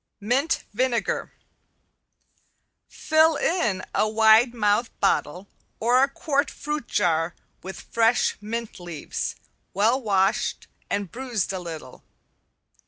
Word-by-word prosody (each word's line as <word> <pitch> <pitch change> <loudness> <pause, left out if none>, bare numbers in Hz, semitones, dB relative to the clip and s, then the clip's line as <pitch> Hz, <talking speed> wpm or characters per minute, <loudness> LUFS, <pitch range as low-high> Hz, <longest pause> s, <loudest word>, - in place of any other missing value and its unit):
~MINT 260 +10 0
VINEGAR~ 245 +1 -1 1.6
Fill 315 0 +3
in 235 - 0
a 215 - +2
wide 220 +2 +5
mouthed 220 0 0
bottle 180 +7 0 0.3
or 245 +3 +3
a 275 - +3
quart 280 0 0
fruit 300 -3 -5
jar 165 0 +1 0.3
with 190 +1 -8
fresh 230 +1 +1
mint 230 +1 -5
leaves, 175 -4 -5 0.4
well 225 +7 +3
washed 200 0 +1 0.2
and 200 -3 -2
bruised 240 -7 -2
a 190 - -3
little. 170 -3 -9
225 Hz, 105 wpm, -24 LUFS, 195-255 Hz, 1.6 s, wide